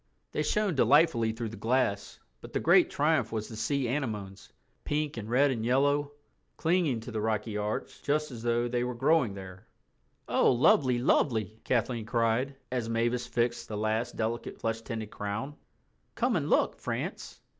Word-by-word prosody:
They - - -1
shone 205 +5 +1
delightfully 140 -5 +4
through 115 0 -4
the 110 - -9
glass. 115 -4 0 0.2
But - - -11
the - - +1
great - - +5
triumph - - +1
was 110 -1 -3
the 115 - -9
sea 130 +4 -1
anemones—pink 125 +5 -4
and 110 -2 -6
red 135 +4 +4
and 115 -4 -2
yellow—clinging 145 - 0
to 115 - -8
the 110 -1 -2
rocky 110 0 -1
arch 105 +1 -3
just 150 0 0
as 120 -3 -8
though 120 +1 +1
they 120 0 -1
were 125 0 -3
growing 135 -4 +2
there. 95 -1 -10 0.6
"Oh, - - +4
lovely, 125 +1 +4
lovely," 110 -4 +1
Kathleen 120 -2 -1
cried, 120 +4 +1 0.2
as 120 -3 -2
Mavis 120 +1 0
fixed 120 0 -1
the 105 - -5
last 110 +3 -1
delicate 115 +1 -3
flesh 115 0 -2
tinted 110 -2 -5
crown. 105 +8 -4 0.6
"Come - - +1
and - - -1
look, - - +2
France." - - -5
120 Hz, 160 wpm, -29 LUFS, 110-135 Hz, 0.6 s, great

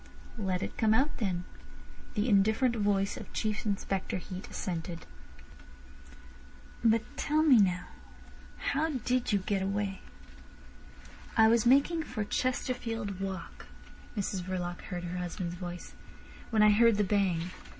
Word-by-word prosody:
"Let 190 -2 -1
it - - -6
come 220 -1 +4
out, 275 +5 +1
then," 185 -5 -1 0.7
the 210 +3 +1
indifferent 220 +4 +3
voice 200 -2 +1
of - - -9
Chief 215 0 -2
Inspector 195 -2 -1
Heat 185 +1 -7
assented. 170 -2 -4 1.8
"But 225 -1 +4
tell 305 +1 +2
me 275 -7 +7
now 180 -3 +2 0.7
how 305 +3 0
did 250 -1 0
you 205 - +4
get 195 0 -1
away." 195 0 -2 1.4
"I 220 -1 +7
was 230 +1 +4
making 280 +6 +4
for 245 -8 -3
Chesterfield 235 -4 -2
Walk," 190 -3 -6 0.5
Mrs 195 -2 -1
Verloc 180 -1 -4
heard 175 -2 -5
her 180 +1 -4
husband's 175 0 -4
voice, 180 0 -7 0.6
"when 220 -2 +4
I 210 - +7
heard 230 0 +5
the 210 - +3
bang. 185 -4 +1
205 Hz, 130 wpm, -30 LUFS, 185-230 Hz, 1.8 s, me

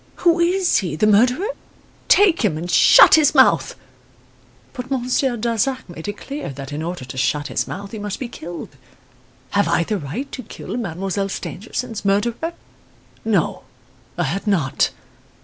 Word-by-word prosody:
Who 340 0 +5
is 355 +1 +2
he 175 -6 -3
the 185 - +1
murderer? 245 - +3 0.6
Take 385 -8 +5
him 180 -8 +1
and 175 +2 -4
shut - - +7
his 305 -1 +5
mouth. 170 - +4 1.0
But 250 0 -7
Monsieur 255 -1 0
Darzac 235 +3 -1
made 170 -1 -9
it 205 0 -4
clear 285 +2 -6
that 135 0 -8
in 150 - -4
order 170 -4 -5
to 130 +1 -9
shut 145 +2 0
his - - -1
mouth 200 +1 -7
he 220 - -6
must 205 -1 -5
be 255 - -4
killed. 175 -6 -8 0.8
Have 200 0 +2
I 170 - +2
the 210 +3 -2
right 180 - -5
to 255 - -6
kill 230 - -8
Mademoiselle 195 -2 -3
Stangerson's 225 +3 -5
murderer? 230 +11 0 0.7
No, - - 0 0.6
I - - +1
had 195 +2 -3
not. 170 -10 +1
210 Hz, 160 wpm, -20 LUFS, 175-255 Hz, 1.0 s, shut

